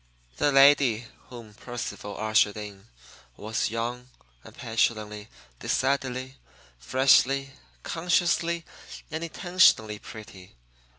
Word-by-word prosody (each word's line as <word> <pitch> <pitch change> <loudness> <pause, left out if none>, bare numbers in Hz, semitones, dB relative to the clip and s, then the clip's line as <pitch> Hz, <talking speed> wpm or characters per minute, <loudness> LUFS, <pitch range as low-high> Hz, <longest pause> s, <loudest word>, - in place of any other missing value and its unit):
The 145 - +2
lady 135 -4 +5 0.2
whom 115 -4 -11
Percival 115 -2 -7
ushered 110 -1 +2
in 105 -1 -9 0.5
was 110 +2 -2
young 120 +2 -4 0.3
and - - -15
petulantly, 110 -2 -2 0.3
decidedly, 130 -1 -2 0.4
freshly, 135 - +3 0.3
consciously, 170 0 0 0.5
and 160 +1 -4
intentionally 165 - +2
pretty. 95 - -12
120 Hz, 85 wpm, -26 LUFS, 110-140 Hz, 0.5 s, lady